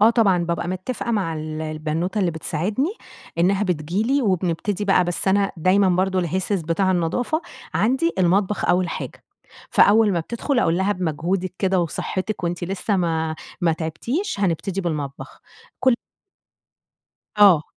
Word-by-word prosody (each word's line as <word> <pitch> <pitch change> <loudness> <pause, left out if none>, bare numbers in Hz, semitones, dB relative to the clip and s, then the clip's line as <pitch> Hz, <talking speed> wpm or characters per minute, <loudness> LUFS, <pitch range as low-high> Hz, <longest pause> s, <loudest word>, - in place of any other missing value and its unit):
آه، 220 +2 +7
طبعًا 195 -7 +3
بابقى 170 0 -2
متفقة 185 +7 -3
مع 190 -7 0
ال 155 0 -5
البنوتة 155 +5 -2
اللي 180 -3 +2
بتساعدني 205 - -2 0.4
إنها 190 +4 +3
بتيجي 180 +1 -1
لي 275 +4 +1
وبنبتدي 190 0 0
بقى، 195 -2 +4
بس 175 +2 -1
أنا 200 0 +2
دايمًا 185 +4 +3
برضه 185 +1 +1
الهسهس 185 +2 -1
بتاع 170 +4 +1
النضافة 230 - 0 0.3
عندي 265 +9 +2
المطبخ 190 +3 +2
أول 180 0 +2
حاجة، - - -6 0.5
فأول 215 0 +5
ما 170 - +1
بتدخل 235 - -2
أقول 170 -8 +2
لها 195 +2 +2
بمجهودِك 180 +2 -2
كده 190 -2 +2
وصحتِك 185 +4 -3
وأنتِ 175 +1 -2
لسه 195 +3 -1
ما 160 -3 0 0.3
ما 170 -2 +3
تعبتيش، 200 - -3
هنبتدي 190 +1 0
بالمطبخ 150 -6 -5 0.4
كُلّ 260 -2 +4 1.4
آه، 195 -7 +7
185 Hz, 140 wpm, -22 LUFS, 170-205 Hz, 1.4 s, آه